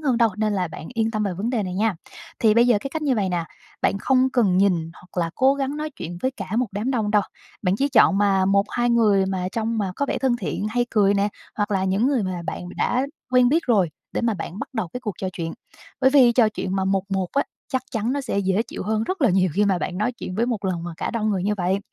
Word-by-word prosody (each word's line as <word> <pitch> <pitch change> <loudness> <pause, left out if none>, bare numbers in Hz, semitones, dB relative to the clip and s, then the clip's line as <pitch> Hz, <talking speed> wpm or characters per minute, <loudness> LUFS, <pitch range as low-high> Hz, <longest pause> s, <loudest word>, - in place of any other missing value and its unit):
hơn 270 -6 +1
đâu, 230 -1 +5
nên 215 0 0
là 185 -4 -1
bạn 160 +1 -9
yên 225 -1 +1
tâm 215 -2 -1
về 200 -3 -1
vấn 210 +6 -2
đề 235 -5 0
này 185 -1 -4
nha. 215 +1 +1 0.4
Thì 215 -2 +4
bây 235 +1 +5
giờ 235 -4 +4
cái 275 - -5
cách 315 +1 -4
như 275 -4 +2
vầy 200 -4 0
nè, 175 -2 -1 0.4
bạn 200 - +2
không 260 +1 +2
cần 205 -8 +2
nhìn 175 -5 +2
hoặc 180 0 -6
là 165 - -4
cố 270 +1 +4
gắng 280 +1 -2
nói 305 0 -3
chuyện 175 - -7
với 260 - +1
cả 200 -8 -7
một 250 - +2
đám 210 +6 -2
đông 220 -5 0
đâu. 210 -1 +4 0.4
Bạn 185 +1 +1
chỉ 280 +4 +1
chọn 215 -7 +5
mà 195 -2 +3
một 200 +2 +2
hai 240 0 +1
người 210 -5 +4
mà 185 -1 -2
trông 225 0 -1
mà 190 -3 -1
có 285 - 0
vẻ - - -1
thân 260 -3 +1
thiện - - -4
hay 240 +2 +1
cười 205 -2 +3
nè 200 +1 +2 0.3
hoặc 205 0 -1
là 190 -1 +1
những 195 +6 +1
người 270 -5 +2
mà 185 -2 -3
bạn 180 - -5
đã 255 +3 +1 0.2
quen 250 -1 +5
biết 320 +4 +2
rồi 200 -9 +3 0.2
để - - -1
mà 235 -2 +1
bạn 180 +1 -6
bắt - - -5
đầu 220 -7 -2
cái 250 - -5
cuộc 210 -6 -4
trò 190 - -2
chuyện 165 -2 -4 0.5
bởi 265 0 +5
vì 260 -4 +6
trò 230 -3 +4
chuyện 195 -2 -3
mà 190 - 0
1-1 195 -1 -1
á, 280 - +2 0.3
chắc 260 -2 -1
chắn 225 +2 -1
nó 285 - -1
sẽ 255 -6 -2
dễ 195 +2 +1
chịu 235 - -7
hơn 220 +2 0
rất 370 +2 -3
là 250 - +5
nhiều 185 0 +2
khi 205 - +3
mà 195 -3 +2
bạn 180 +1 -4
nói 230 +4 0
chuyện 185 -5 -7
với 230 +4 +1
một 225 -5 -2
lần 180 -3 -1
mà 175 - -5
cả - - -3
đông 215 -2 0
người 190 -3 -1
như 210 +2 +1
vậy. 185 +1 0
210 Hz, 280 wpm, -23 LUFS, 190-245 Hz, 0.5 s, vì